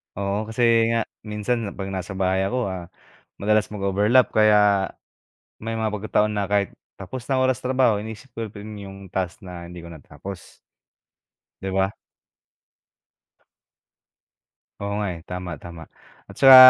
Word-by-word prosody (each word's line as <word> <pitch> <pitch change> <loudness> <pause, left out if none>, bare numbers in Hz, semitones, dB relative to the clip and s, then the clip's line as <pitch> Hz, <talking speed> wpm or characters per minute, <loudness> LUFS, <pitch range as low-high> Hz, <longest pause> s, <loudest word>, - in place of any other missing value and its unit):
Oo, 100 +2 -1
kasi 110 +2 -3 0.3
nga 115 - +2 0.2
minsan 105 +1 -1
'pag 95 -1 -4
na 95 - -2
sa 95 +2 -6
bahay 95 0 +2
ako, 120 -4 0
ah, 90 -2 -5 0.5
madalas 105 +1 +2
mag-overlap 105 +4 +3
kaya 105 -3 +5 0.7
may 115 +1 -4
mga 110 -1 0
pagkataon 105 0 +1
na 100 - +1
kahit 100 0 +1 0.2
tapos 115 +6 -6
na 135 -1 +2
oras 130 -1 +2
trabaho 125 -4 +4
iniisip 110 +4 -6
ko 110 -3 -4
pa 100 - -9
rin 105 0 -7
yung 95 0 -10
task 95 +1 -2
na 90 -3 -8
hindi 90 0 -9
ko 85 - -9
natapos. 85 +4 -9 1.1
'Di 95 - -2
ba? 95 0 +2 2.9
Oo 100 - -2
nga, 105 - 0
eh, 85 - -9
tama, 90 0 -4
tama. 85 -1 -8 0.5
At - - -11
saka 135 -1 +11
100 Hz, 145 wpm, -24 LUFS, 95-110 Hz, 2.9 s, saka